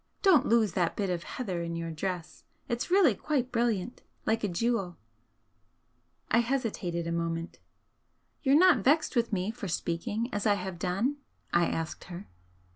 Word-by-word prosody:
Don't 340 Hz, -9 st, +5 dB
lose 225 Hz, -3 st, +3 dB
that 175 Hz, 0 st, 0 dB
bit 195 Hz, -3 st, -1 dB
of 175 Hz, -1 st, -2 dB
heather 185 Hz, -4 st, -4 dB
in 170 Hz, 0 st, -3 dB
your 165 Hz, 0 st, -4 dB
dress, 175 Hz, 0 st, -4 dB, 0.2 s
it's 240 Hz, +6 st, -2 dB
really 360 Hz, -, +5 dB
quite 260 Hz, +2 st, -1 dB
brilliant 235 Hz, -2 st, -1 dB, 0.2 s
like 220 Hz, 0 st, +1 dB
a -, -, +2 dB
jewel." 195 Hz, -1 st, -1 dB, 1.3 s
I 235 Hz, -, +5 dB
hesitated 225 Hz, -9 st, -1 dB
a 170 Hz, -, -2 dB
moment. 165 Hz, 0 st, -3 dB, 0.8 s
"You're 275 Hz, 0 st, +5 dB
not 360 Hz, -5 st, +6 dB
vexed 305 Hz, +5 st, +3 dB
with 235 Hz, -1 st, +1 dB
me 195 Hz, +1 st, 0 dB
for 225 Hz, -3 st, -6 dB
speaking 185 Hz, +7 st, -2 dB
as 205 Hz, +1 st, 0 dB
I 205 Hz, -, +4 dB
have 185 Hz, -3 st, -5 dB
done?" 200 Hz, -, 0 dB, 0.4 s
I 170 Hz, 0 st, +4 dB
asked 165 Hz, 0 st, -4 dB
her. 180 Hz, +2 st, -8 dB
205 Hz, 160 wpm, -29 LUFS, 175-240 Hz, 1.3 s, not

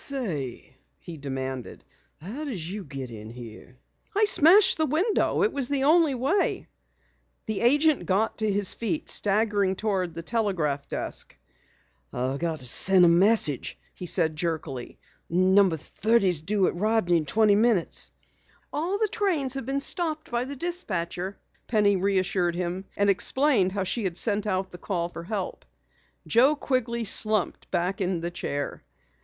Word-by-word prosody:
"Say," 155 Hz, -, -5 dB, 0.2 s
he 170 Hz, -, -10 dB
demanded, 135 Hz, -2 st, -6 dB, 0.4 s
"how 220 Hz, -, -7 dB
did 205 Hz, -, -4 dB
you 195 Hz, +4 st, -5 dB
get 135 Hz, -5 st, -8 dB
in 110 Hz, -1 st, -9 dB
here?" 120 Hz, +1 st, -12 dB, 0.5 s
"Smashed 385 Hz, 0 st, +6 dB
the 315 Hz, -, +2 dB
window. 380 Hz, -, +1 dB
It 430 Hz, -, +1 dB
was 275 Hz, -3 st, 0 dB
the 280 Hz, -1 st, 0 dB
only 310 Hz, -1 st, +4 dB
way." 280 Hz, +11 st, 0 dB, 0.8 s
The 220 Hz, -2 st, -3 dB
agent 290 Hz, +5 st, +3 dB
got 205 Hz, +5 st, 0 dB
to 215 Hz, -1 st, 0 dB
his 200 Hz, -1 st, +1 dB
feet, 300 Hz, +7 st, -2 dB
staggering 205 Hz, -2 st, +1 dB
toward 190 Hz, -5 st, -2 dB
the 165 Hz, -, -6 dB
telegraph 165 Hz, -9 st, -2 dB
desk. -, -, -4 dB, 0.7 s
"I've 130 Hz, +3 st, -3 dB
got 165 Hz, -2 st, -2 dB
to 130 Hz, -, -6 dB
send 185 Hz, +8 st, +4 dB
a -, -, +6 dB
message," 170 Hz, -, +3 dB, 0.2 s
he 180 Hz, -, -8 dB
said 160 Hz, -3 st, 0 dB
jerkily. 155 Hz, -6 st, -4 dB, 0.3 s
"No. 185 Hz, +3 st, +4 dB
30's 185 Hz, +1 st, +1 dB
due 195 Hz, +3 st, +1 dB
at -, -, 0 dB
Rodney 205 Hz, -2 st, +1 dB
in 155 Hz, -2 st, -3 dB
twenty 215 Hz, +6 st, +3 dB
minutes." 210 Hz, -3 st, +1 dB, 0.6 s
"All 340 Hz, +7 st, -1 dB
the 435 Hz, +1 st, +1 dB
trains 350 Hz, -, 0 dB
have 270 Hz, -3 st, -5 dB
been 275 Hz, +1 st, -1 dB
stopped 315 Hz, -3 st, 0 dB
by 240 Hz, +1 st, -1 dB
the 280 Hz, +2 st, -6 dB
dispatcher," 195 Hz, -, -3 dB, 0.3 s
Penny 210 Hz, -3 st, +3 dB
reassured 185 Hz, -2 st, 0 dB
him, 180 Hz, +2 st, -4 dB
and 200 Hz, -, +2 dB
explained 200 Hz, 0 st, +3 dB
how 200 Hz, -1 st, -1 dB
she 210 Hz, +3 st, -2 dB
had 180 Hz, -2 st, -3 dB
sent 210 Hz, 0 st, 0 dB
out 190 Hz, -1 st, -2 dB
the 180 Hz, -, -11 dB
call 170 Hz, -3 st, -3 dB
for 170 Hz, -1 st, -9 dB
help. 195 Hz, -1 st, -4 dB, 0.6 s
Joe 260 Hz, +6 st, +4 dB
Quigley 235 Hz, -5 st, -2 dB
slumped 215 Hz, 0 st, +1 dB
back 180 Hz, +3 st, -2 dB
in 180 Hz, -2 st, -1 dB
the 170 Hz, +1 st, -4 dB
chair. 145 Hz, -4 st, -5 dB
200 Hz, 155 wpm, -26 LUFS, 170-245 Hz, 0.8 s, Smashed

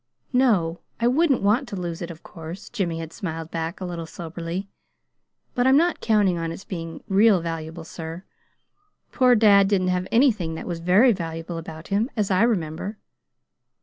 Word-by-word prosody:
"No, 200 Hz, -10 st, +2 dB, 0.2 s
I 235 Hz, -, +2 dB
wouldn't 275 Hz, -1 st, +3 dB
want 225 Hz, +7 st, +2 dB
to 210 Hz, -, -6 dB
lose 175 Hz, -3 st, -4 dB
it, 170 Hz, -, -4 dB
of 160 Hz, -2 st, -10 dB
course," 165 Hz, +2 st, -9 dB
Jimmy 180 Hz, -8 st, -2 dB
had 165 Hz, 0 st, -6 dB
smiled 165 Hz, -5 st, -5 dB
back, 165 Hz, +1 st, -3 dB
a 185 Hz, -, -4 dB
little 170 Hz, -2 st, -5 dB
soberly. 170 Hz, +3 st, -5 dB, 0.9 s
"But 245 Hz, +1 st, +2 dB
I'm 265 Hz, +1 st, +6 dB
not 345 Hz, +2 st, +2 dB
counting 205 Hz, -6 st, +2 dB
on 165 Hz, 0 st, -2 dB
its 175 Hz, -, -8 dB
being 165 Hz, -3 st, -6 dB
real 200 Hz, 0 st, +5 dB
valuable, 165 Hz, 0 st, -5 dB
sir. 165 Hz, +2 st, -7 dB, 0.9 s
Poor 250 Hz, -2 st, +5 dB
dad 200 Hz, -3 st, +6 dB
didn't 190 Hz, -2 st, +1 dB
have 180 Hz, 0 st, 0 dB
anything 220 Hz, -, +3 dB
that -, -, -6 dB
was 170 Hz, -2 st, -4 dB
very 190 Hz, +9 st, +5 dB
valuable 165 Hz, -3 st, -4 dB
about 160 Hz, 0 st, -9 dB
him, 205 Hz, +5 st, +1 dB
as 205 Hz, -2 st, 0 dB
I 185 Hz, +1 st, +3 dB
remember." 195 Hz, -2 st, 0 dB
180 Hz, 175 wpm, -24 LUFS, 165-215 Hz, 0.9 s, I'm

